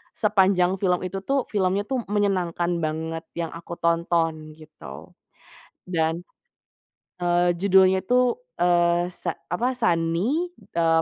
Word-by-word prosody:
sepanjang 190 -3 +2
film 180 -2 +1
itu 190 +1 -4
tuh 270 +6 0
filmnya 195 -1 +1
tuh 260 +4 -2
menyenangkan 180 -4 0
banget 160 +1 -3
yang 170 -1 -3
aku 170 +1 -8
tonton 165 -2 0
gitu. 150 - -12 0.8
Dan, 165 -1 0 1.0
eee, 175 0 +1
judulnya 190 0 +4
itu, 250 - +2 0.2
eee, 175 0 +3
se 175 -1 -4 0.2
apa 240 +9 0
Sunny, 175 - 0 0.3
eee, 165 -1 +3
175 Hz, 115 wpm, -24 LUFS, 165-195 Hz, 1.0 s, judulnya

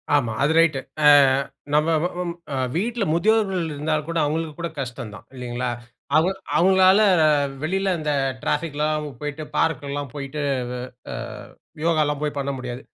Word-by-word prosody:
ஆமா. 120 -6 +1
அது 150 - +3
ரைட்டு. 160 -4 +3 0.3
அ - - +9 0.7
நம்ம 150 +2 +3
வ - - +2 0.7
வீட்ல 230 +5 -1
முதியோர்கள் 195 +1 +2
இருந்தா 150 +2 -2
கூட, 165 0 -2
அவங்களுக்கு 155 +1 -1
கூட 170 0 -2
கஷ்டந்தான். 120 -6 -6
இல்லீங்களா! 125 0 -3 0.5
அவுங்க 175 +5 +3 0.2
அவுங்களால 190 +2 +5 0.6
வெளியில 190 +3 0
அந்த 150 -1 -1 0.3
ட்ராஃபிக்லாம் 150 0 -1 0.2
போயிட்டு, 150 +1 -4
பார்க் 150 -4 +1
எல்லாம் 140 -2 -4
போயிட்டு. 140 +1 -5 0.4
அ 125 - -5 0.3
அ - - -4 0.7
யோகாலாம் 150 -3 +1
போய் 145 -1 -2
பண்ண 140 0 -1
முடியாது. 125 0 -6
150 Hz, 135 wpm, -23 LUFS, 140-170 Hz, 0.7 s, அ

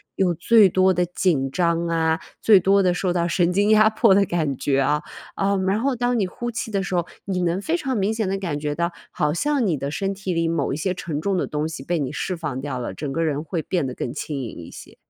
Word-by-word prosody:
有 185 -2 +2
最 200 +5 +5
多 185 +1 +3
的 180 0 +1
紧 165 -6 0
张 170 +1 +1
啊， 160 0 +1 0.2
最 210 -3 +6
多 195 +2 +3
的 180 -2 +2
受 180 0 0
到 170 -1 +1
神 175 +1 +1
经 205 +3 +2
压 215 0 +6
迫 220 -2 +4
的 200 0 +4
感 155 -7 -1
觉 135 0 +1
啊， 150 +2 +1 0.3
啊， 200 +1 +1
然 190 +2 0
后 270 +1 +1
当 245 +1 0
你 205 - +1
呼 240 +6 -5
气 225 -1 -4
的 200 -2 0
时 190 -1 -3
候， 175 -1 +1 0.2
你 185 -2 -1
能 175 +3 0
非 330 +10 0
常 270 -6 -2
明 200 +2 +1
显 220 -2 -1
地 195 +1 -1
感 165 -7 -3
觉 150 0 -2
到， 170 +2 -1 0.2
好 150 - 0
像 275 - +1
你 165 -5 +1
的 140 +1 -4
身 195 +6 -2
体 190 -1 -3
里 165 0 0
某 160 -5 -1
一 - - -3
些 185 +3 -1
沉 155 -4 -4
重 195 +1 0
的 - - 0
东 150 +1 -2
西 155 -4 -7
被 170 +2 -1
你 135 -1 -2
释 185 +4 -2
放 150 -6 -4
掉 135 -3 -4
了， 120 - -5
整 145 -3 -4
个 165 +3 0
人 150 -1 -1
会 165 +1 -3
变 175 -5 -1
得 130 - -4
更 120 - -4
轻 145 -1 -4
盈 120 - -7
一 - - -12
些。 - - -12
175 Hz, 285 characters per minute, -23 LUFS, 150-195 Hz, 0.3 s, 最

